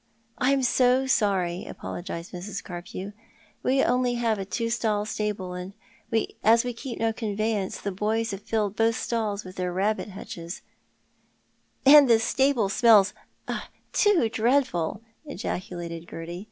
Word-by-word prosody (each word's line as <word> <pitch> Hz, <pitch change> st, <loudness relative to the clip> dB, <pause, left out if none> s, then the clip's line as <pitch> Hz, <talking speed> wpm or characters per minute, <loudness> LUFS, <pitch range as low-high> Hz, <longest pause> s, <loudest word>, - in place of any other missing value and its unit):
" 225 Hz, -, -41 dB
I 260 Hz, 0 st, +3 dB
am 275 Hz, -1 st, +2 dB
so 255 Hz, +1 st, +3 dB
sorry," 195 Hz, -8 st, +1 dB
apologised 175 Hz, -1 st, -6 dB
Mrs. 190 Hz, +2 st, -6 dB
Carpew. 185 Hz, +2 st, -7 dB, 0.3 s
" 210 Hz, 0 st, -32 dB
^^'c 260 Hz, +2 st, +3 dB
have 270 Hz, -, +3 dB
only 245 Hz, -1 st, +1 dB
a 215 Hz, -4 st, +1 dB
two 230 Hz, +3 st, -2 dB
stall 215 Hz, -3 st, 0 dB
stable, 210 Hz, -4 st, -3 dB
and 180 Hz, +2 st, -6 dB, 0.7 s
as 230 Hz, +1 st, +5 dB
we 245 Hz, -, -2 dB
keep 240 Hz, +1 st, -6 dB
no 225 Hz, 0 st, +1 dB
conveyance, 215 Hz, -2 st, -2 dB
the 200 Hz, -, -3 dB
boys 215 Hz, +4 st, -1 dB
have 195 Hz, 0 st, -6 dB
filled 210 Hz, -2 st, -1 dB
both 225 Hz, 0 st, +2 dB
stalls 215 Hz, -4 st, -2 dB
with 185 Hz, 0 st, -11 dB
their 180 Hz, -1 st, -1 dB
rabbit 205 Hz, +4 st, 0 dB
hutches 170 Hz, -3 st, -8 dB, 0.4 s
" -, -, -41 dB
" -, -, -41 dB
And 280 Hz, -1 st, +9 dB
the 230 Hz, -, +7 dB
stable 250 Hz, 0 st, +2 dB
smells 210 Hz, -1 st, +5 dB, 0.4 s
— -, -, -4 dB, 0.3 s
too 405 Hz, -, +4 dB
dreadful," 225 Hz, -, +1 dB, 0.2 s
ejaculated 170 Hz, -, -5 dB
Gerty. 170 Hz, +2 st, -6 dB
215 Hz, 155 wpm, -26 LUFS, 190-235 Hz, 0.7 s, And